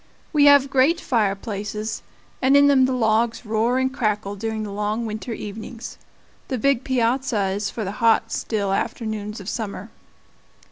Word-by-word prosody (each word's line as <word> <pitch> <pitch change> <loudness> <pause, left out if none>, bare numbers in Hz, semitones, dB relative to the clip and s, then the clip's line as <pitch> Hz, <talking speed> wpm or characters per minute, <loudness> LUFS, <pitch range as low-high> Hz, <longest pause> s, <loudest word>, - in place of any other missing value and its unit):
We 290 -2 +5
have 285 -1 +6
great 275 +6 +3
fireplaces, 210 -2 -2 0.4
and 270 +2 +5
in 285 - +6
them 275 -2 +5
the - - -1
logs 230 -1 +1
roar 225 +3 +1
and 260 0 0
crackle 210 -4 -1
during 220 +1 -3
the 205 - -6
long 210 +3 -2
winter 220 +2 -5
evenings. 220 +2 -7 0.5
The 260 - -2
big 275 +1 +1
piazza 245 -5 0
is 205 +1 -2
for 225 - -5
the 195 - -3
hot, 225 0 +3
still 200 -4 -1
afternoons 215 -1 -3
of 195 - -10
summer. 215 -1 -5
225 Hz, 155 wpm, -22 LUFS, 210-255 Hz, 0.5 s, have